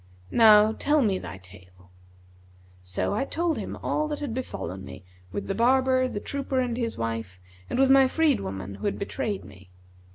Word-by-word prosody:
Now 215 -1 +7
tell 295 +5 +2
me 195 -4 +1
thy - - -8
tale.' 90 -1 -18 0.9
So 90 - -2
I 215 - 0
told 330 +3 -1
him - - -5
all 305 - 0
that 300 -1 -3
had 285 -6 -4
befallen 95 - -5
me 95 0 -10 0.3
with 200 - -4
the 195 - -2
barber, 255 +3 +3
the 205 - -4
trooper 275 +2 -2
and 245 -2 -1
his 235 -2 -3
wife 115 -5 -4 0.3
and - - -2
with 265 0 +4
my 270 -1 +7
freed 305 0 +2
woman 95 0 -6
who 100 - -8
had 205 - -1
betrayed 205 -1 -3
me. 95 -1 -15
220 Hz, 185 wpm, -26 LUFS, -, 0.9 s, Now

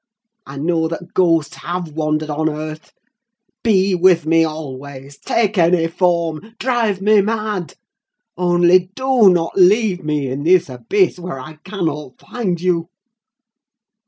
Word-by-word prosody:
I 135 +1 -9
know 160 +2 0
that 170 +2 -7
ghosts 165 -4 +1
have 175 0 -5
wandered 155 0 -2
on 155 +2 0
earth. 155 0 -7 0.7
Be 195 -4 +2
with 175 -2 +3
me 165 +1 +3
always—take 145 - -3
any 165 0 +3
form—drive 190 +6 -1
me 210 0 +5
mad! 210 -4 -3 0.6
only 175 +1 +3
do 260 -6 +4
not 170 -2 0
leave 195 0 +3
me 150 -2 -1
in 130 +2 -4
this 175 0 +3
abyss, 170 - 0
where 175 -6 -6
I 155 +3 -11
cannot 160 -9 -4
find 190 -8 -3
you! 170 -2 0
175 Hz, 125 wpm, -18 LUFS, 155-190 Hz, 0.7 s, me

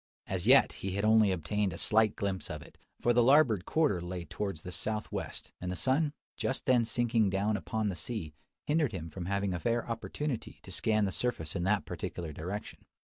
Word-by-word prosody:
As 95 +1 -3
yet, 135 +2 +7
he 95 -1 -4
had 100 +2 0
only 110 -2 +5
obtained 95 +2 -1
a - - -6
slight 110 +2 +4
glimpse 95 -2 -2
of - - -5
it: - - -18 0.2
for 120 - +3
the 120 - +5
larboard 125 - +5
quarter 150 - +2
lay 90 0 -5
towards 95 -6 -4
the 90 - -6
south 105 +3 -2
west, - - -5
and 90 0 -3
the - - -3
sun, 140 - +2 0.3
just 130 - -2
then 125 -3 +4
sinking 115 -3 +2
down 100 +3 +1
upon 105 +1 -1
the 95 - -3
sea, 80 -2 -4 0.3
hindered 150 -5 +1
him 85 -3 -5
from 90 -2 -6
having 100 -1 0
a 85 - -2
fair 120 +4 0
opportunity 120 +3 -4
to - - -10
scan 110 -2 +2
the 95 - -1
surface 85 -9 -2
in 85 - -1
that 100 0 +2
particular 85 -3 -5
direction. 90 +8 -6
105 Hz, 205 wpm, -31 LUFS, 90-120 Hz, 0.3 s, yet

